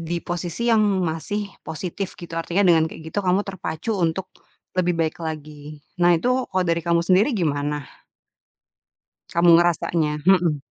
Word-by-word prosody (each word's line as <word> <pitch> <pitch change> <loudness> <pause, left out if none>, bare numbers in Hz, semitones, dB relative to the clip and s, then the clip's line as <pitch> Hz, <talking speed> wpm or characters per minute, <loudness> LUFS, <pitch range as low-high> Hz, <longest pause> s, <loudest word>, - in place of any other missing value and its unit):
di 170 +1 -3
posisi 175 +7 -2
yang 220 -1 +4 0.2
masih 195 +6 -3 0.2
positif 180 +4 -5
gitu 170 -1 -10
artinya 175 +4 0
dengan 165 -2 +5
kayak 160 - -11
gitu - - -1
kamu 185 +2 +2
terpacu 190 +1 -4
untuk 175 +3 -1 0.5
lebih 180 -1 +2
baik 160 0 -1
lagi. 150 -1 -7 0.2
Nah 175 0 +5
itu 250 +8 0
kalau 185 -1 +1
dari 170 0 +1
kamu 170 0 +2
sendiri 190 +9 +4
gimana? 145 -4 -1 1.5
Kamu 170 +1 +3
ngerasanya, 165 -3 +1
mhm. 175 -5 +4
170 Hz, 145 wpm, -23 LUFS, 160-185 Hz, 1.5 s, dengan